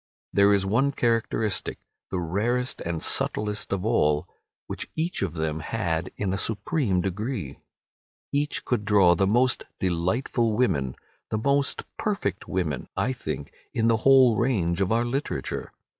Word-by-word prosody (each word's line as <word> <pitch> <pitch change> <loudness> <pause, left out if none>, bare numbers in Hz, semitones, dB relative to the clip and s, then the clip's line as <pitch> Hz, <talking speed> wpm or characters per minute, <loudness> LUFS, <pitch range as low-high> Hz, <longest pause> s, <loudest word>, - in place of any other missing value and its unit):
There 100 0 +5
is 100 -1 +3
one 130 +8 +2
characteristic, 115 -3 0 0.3
the 95 - -2
rarest 115 - -1
and 85 -2 -3
subtlest 105 0 0
of 100 0 -1
all, 75 -10 +2 0.4
which - - -5
each 165 +3 -1
of 90 -4 -2
them 80 -1 -2
had 85 -2 -2
in 95 -2 -1
a 95 - -1
supreme 110 - 0
degree. 95 - -3 0.7
Each 145 +1 0
could 120 -4 0
draw 100 -4 +5
the 95 +3 +2
most 120 +5 +3 0.2
delightful 105 +6 0
women—the 95 - -2
most 140 +4 +1 0.2
perfect 150 - -2
women, 80 -8 -2
I 130 - +1
think, 75 - -5 0.2
in 115 0 +3
the 115 - +4
whole 130 -1 +6
range 100 -8 +1
of 95 - +1
our 115 +1 +2
literature. 135 +4 -3
105 Hz, 145 wpm, -26 LUFS, 90-120 Hz, 0.7 s, whole